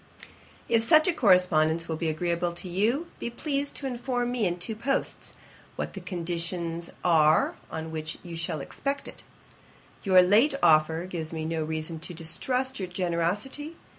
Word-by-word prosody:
'If 230 Hz, -1 st, +3 dB
such 310 Hz, +8 st, +6 dB
a 365 Hz, -, +3 dB
correspondence 170 Hz, -, +3 dB
will 160 Hz, -, -2 dB
be 160 Hz, 0 st, -1 dB
agreeable 170 Hz, +2 st, -1 dB
to 175 Hz, -, -8 dB
you, 220 Hz, -, +1 dB
be -, -, -3 dB
pleased 280 Hz, +3 st, -2 dB
to 275 Hz, -, -4 dB
inform 245 Hz, -1 st, -1 dB
me 235 Hz, -5 st, +1 dB
in 175 Hz, 0 st, -2 dB
two 215 Hz, +5 st, -4 dB
posts, 260 Hz, +5 st, -2 dB, 0.4 s
what -, -, -4 dB
the -, -, -6 dB
conditions 170 Hz, -1 st, -3 dB
are 155 Hz, -2 st, +4 dB
on 160 Hz, 0 st, -5 dB
which 160 Hz, 0 st, -5 dB
you 170 Hz, -2 st, -7 dB
shall 165 Hz, -2 st, -3 dB
expect 275 Hz, -, -4 dB
it. -, -, -8 dB, 0.8 s
Your 185 Hz, -2 st, +6 dB
late 220 Hz, +10 st, +4 dB
offer 160 Hz, +2 st, +4 dB
gives 165 Hz, -4 st, -5 dB
me 160 Hz, -1 st, -4 dB
no 160 Hz, 0 st, -1 dB
reason 160 Hz, +1 st, -4 dB
to 175 Hz, +2 st, -7 dB
distrust 250 Hz, +11 st, -1 dB
your 190 Hz, -, -3 dB
generosity. 185 Hz, -, -2 dB
175 Hz, 165 wpm, -27 LUFS, 165-235 Hz, 0.8 s, such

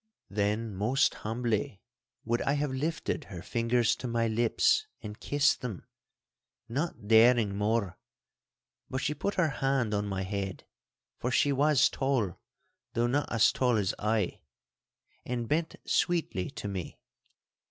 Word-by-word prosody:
Then 105 Hz, +2 st, -1 dB
most 125 Hz, +10 st, +2 dB
humbly 110 Hz, -3 st, -2 dB, 0.5 s
would 120 Hz, +1 st, 0 dB
I 140 Hz, -, +1 dB
have 145 Hz, -1 st, -1 dB
lifted 150 Hz, +4 st, -2 dB
her 90 Hz, -5 st, -8 dB
fingers 115 Hz, 0 st, +1 dB
to 125 Hz, -, -5 dB
my 115 Hz, -1 st, +1 dB
lips 120 Hz, -, +2 dB, 0.2 s
and 105 Hz, -1 st, -7 dB
kissed 145 Hz, 0 st, +2 dB
them, 120 Hz, -8 st, -5 dB, 0.8 s
not 130 Hz, -3 st, -3 dB
daring 110 Hz, -2 st, +5 dB
more; 105 Hz, -2 st, 0 dB, 0.9 s
but 130 Hz, -, -3 dB
she 150 Hz, -, 0 dB
put 195 Hz, +7 st, -2 dB
her 175 Hz, -5 st, +2 dB
hand 135 Hz, -5 st, +1 dB
on 105 Hz, 0 st, 0 dB
my 95 Hz, -1 st, -2 dB
head, 95 Hz, -1 st, -4 dB, 0.5 s
for 125 Hz, -, -1 dB
she 140 Hz, +3 st, +3 dB
was 145 Hz, 0 st, +4 dB
tall 130 Hz, -10 st, -1 dB, 0.5 s
(though 115 Hz, -, +1 dB
not 140 Hz, +5 st, 0 dB
as 115 Hz, -2 st, +5 dB
tall 125 Hz, -3 st, +2 dB
as 100 Hz, -3 st, 0 dB
I), 105 Hz, -2 st, 0 dB, 0.8 s
and 120 Hz, -2 st, -3 dB
bent 160 Hz, +4 st, 0 dB
sweetly 165 Hz, -, 0 dB
to -, -, -6 dB
me. 95 Hz, -3 st, -5 dB
115 Hz, 140 wpm, -30 LUFS, 105-135 Hz, 0.9 s, daring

